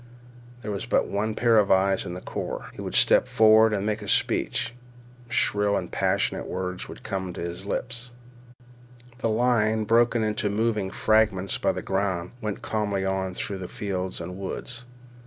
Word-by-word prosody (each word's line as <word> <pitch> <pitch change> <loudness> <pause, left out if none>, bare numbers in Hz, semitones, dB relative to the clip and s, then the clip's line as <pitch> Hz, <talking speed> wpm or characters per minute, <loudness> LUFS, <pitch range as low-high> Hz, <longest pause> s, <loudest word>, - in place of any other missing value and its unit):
There 105 - -3
was 100 - -4
but - - +2
one 105 +2 -2
pair 115 -2 +4
of 100 - +2
eyes 95 0 +3
in 90 - -5
the 90 - -7
corps. - - -5
He - - -8
would - - -5
step - - +5
forth 110 0 +6
and 100 -1 -1
make 105 0 -1
a 105 - -7
speech. 115 - +1 0.6
Shrill 105 -4 +2
and - - -5
passionate - - 0
words 90 0 -4 0.2
came 95 -2 -3
to - - -6
his 85 +3 -5
lips. 120 +3 -3 1.1
The 115 - 0
line, 110 -1 +2
broken 115 +1 +3
into 105 -1 0
moving 105 -1 0
fragments 105 -2 +2
by - - +1
the - - -5
ground, 95 -3 -1
went 105 -2 -4
calmly 105 -3 -1
on 95 -1 -1
through 100 -3 -4
fields 95 -2 -4
and 90 +2 -7
woods. 120 +5 -6
105 Hz, 165 wpm, -26 LUFS, 95-110 Hz, 1.1 s, forth